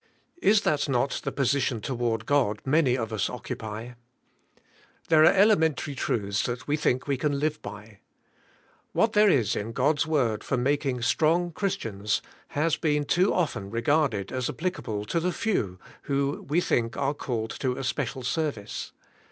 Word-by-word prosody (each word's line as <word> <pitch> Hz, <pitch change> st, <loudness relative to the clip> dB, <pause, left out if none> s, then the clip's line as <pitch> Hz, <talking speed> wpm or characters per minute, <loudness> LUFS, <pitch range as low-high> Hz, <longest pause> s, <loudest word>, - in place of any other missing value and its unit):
Is 205 Hz, +1 st, +5 dB
that 150 Hz, -1 st, 0 dB
not 135 Hz, +1 st, 0 dB
the -, -, -2 dB
position 135 Hz, -3 st, +1 dB
toward 115 Hz, -1 st, -2 dB
God 120 Hz, -7 st, +2 dB
many 135 Hz, -2 st, +3 dB
of 115 Hz, -2 st, -3 dB
us 100 Hz, -3 st, 0 dB
oc 125 Hz, -, -8 dB
cupy. 110 Hz, +3 st, -5 dB, 1.2 s
There 160 Hz, -2 st, +6 dB
are -, -, +8 dB
elementary 160 Hz, -8 st, +3 dB
truths 100 Hz, -6 st, -1 dB
that 120 Hz, 0 st, -5 dB
we 145 Hz, -, +2 dB
think 130 Hz, -4 st, 0 dB
we 140 Hz, -2 st, 0 dB
can 145 Hz, +1 st, 0 dB
live 155 Hz, +1 st, -1 dB
by. 105 Hz, +1 st, -10 dB, 0.9 s
What 225 Hz, 0 st, +2 dB
there 210 Hz, 0 st, +6 dB
is 120 Hz, -, +2 dB
in 110 Hz, +3 st, -4 dB
God's 145 Hz, +4 st, +2 dB
word 120 Hz, -9 st, +1 dB
for 135 Hz, -, -1 dB
making 130 Hz, -1 st, 0 dB
strong 165 Hz, +7 st, +2 dB
Christians 115 Hz, -, -2 dB, 0.2 s
has 155 Hz, +2 st, 0 dB
been 150 Hz, -2 st, +1 dB
too 180 Hz, +6 st, +3 dB
often 145 Hz, -, -1 dB
re 115 Hz, +2 st, -2 dB
garded 125 Hz, -8 st, +1 dB
as 130 Hz, -1 st, -2 dB
applicable 110 Hz, -, -3 dB
to 170 Hz, -, 0 dB
the 180 Hz, +2 st, 0 dB
few 115 Hz, -, -1 dB, 0.3 s
who 140 Hz, 0 st, -1 dB
we 165 Hz, +4 st, +3 dB
think 115 Hz, -8 st, 0 dB
are 140 Hz, 0 st, 0 dB
called 115 Hz, -6 st, -3 dB
to 130 Hz, -2 st, -1 dB
a -, -, -4 dB
special 130 Hz, 0 st, -2 dB
service. 125 Hz, -6 st, -3 dB
135 Hz, 165 wpm, -27 LUFS, 115-155 Hz, 1.2 s, are